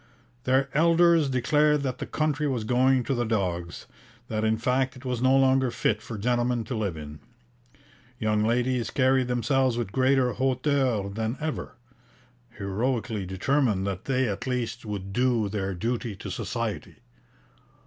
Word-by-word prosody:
Their 130 +1 +3
elders 165 -1 +4
declared 150 +3 +2
that 130 -2 -3
the - - -4
country 150 -1 0
was 125 -5 -1
going 130 +3 +3
to 135 - -1
the 120 -2 0
dogs, 90 -6 -2 0.4
that 110 0 -1
in 110 0 +2
fact 130 +3 0
it 130 +1 -13
was 125 -2 -2
no 130 +1 +4
longer 130 -1 +3
fit 105 -2 0
for 110 0 -7
gentlemen 120 +2 0
to 125 - -5
live 100 -7 -2
in. 75 0 -9 1.0
Young 110 -2 +1
ladies 120 +2 +1
carried 130 -1 +2
themselves 125 +1 +1
with 115 -5 -3
greater 130 0 +2
hauteur 130 -4 +1
than 110 +4 -3
ever, 155 0 -4 0.8
heroically 105 0 -2
determined 105 0 +1
that 100 -1 -4
they 130 -1 +1
at 100 +4 -4
least 120 -2 -3
would 100 -2 -5
do 120 -2 +2
their 95 -2 -3
duty 115 +2 -2
to - - -7
Society. - - -4
125 Hz, 150 wpm, -26 LUFS, 110-130 Hz, 1.0 s, elders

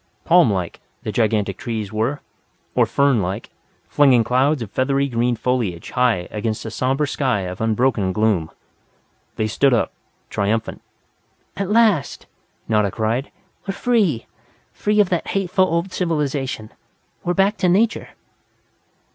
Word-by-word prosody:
Palm 170 -9 +5
like, 90 -4 -3 0.2
the - - -3
gigantic 105 -4 0
trees 110 -3 -4
were, 115 +7 -1 0.5
or - - +3
fern 140 -5 +2
like, 95 +5 -4 0.4
flinging 130 -5 +4
clouds 130 +3 +1
of 105 - -10
feathery 135 +3 +1
green 120 -1 0
foliage 115 -9 -2
high 120 -8 +1
against 110 +1 -3
a 110 - -5
somber 135 +5 0
sky 130 -7 0
of 90 +1 -6
unbroken 110 -3 +1
gloom. 100 -5 +1 0.9
They 110 - -1
stood 125 +4 +3
up, 115 - -1 0.4
triumphant. 110 +3 -1 0.7
"At 195 -1 -3
last!" 215 - +2 0.4
Nada 105 -2 +2
cried. 115 +7 -2 0.4
"We're 195 - -2
free! 205 - +1 0.5
Free 210 0 0
of 205 -3 +4
that 175 -2 -1
hateful 190 -1 +1
old 170 +2 -1
civilization! 145 - -2 0.5
We're 175 0 -1
back 195 +3 +2
to 180 - +2
Nature!" 215 +5 +1
125 Hz, 135 wpm, -21 LUFS, 110-165 Hz, 0.9 s, Palm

